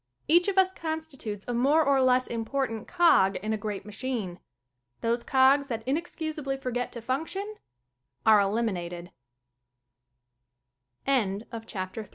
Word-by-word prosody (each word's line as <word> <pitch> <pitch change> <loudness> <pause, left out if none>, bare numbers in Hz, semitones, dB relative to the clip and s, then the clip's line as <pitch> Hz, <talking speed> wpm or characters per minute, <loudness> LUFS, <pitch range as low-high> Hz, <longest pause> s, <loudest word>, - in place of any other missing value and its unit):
Each 345 +5 +5
of 395 -1 -1
us 380 0 +5
constitutes 315 - -5
a 245 - -2
more 280 +7 +4
or 275 -1 +3
less 255 0 +3
impor 235 +4 -1
tant 225 -2 -7
cog 335 - +4
in 215 +3 -2
a - - +1
great 210 -2 -5
machine. 210 -4 -4 0.6
Those 235 +1 0
cogs 270 +1 +4
that 225 -3 -4
inexcusably 305 -2 -2
forget 250 -2 -3
to 235 - -8
function 380 - -3 0.7
are 215 -1 +7
el 190 -5 -1
255 Hz, 120 wpm, -28 LUFS, 220-305 Hz, 0.7 s, are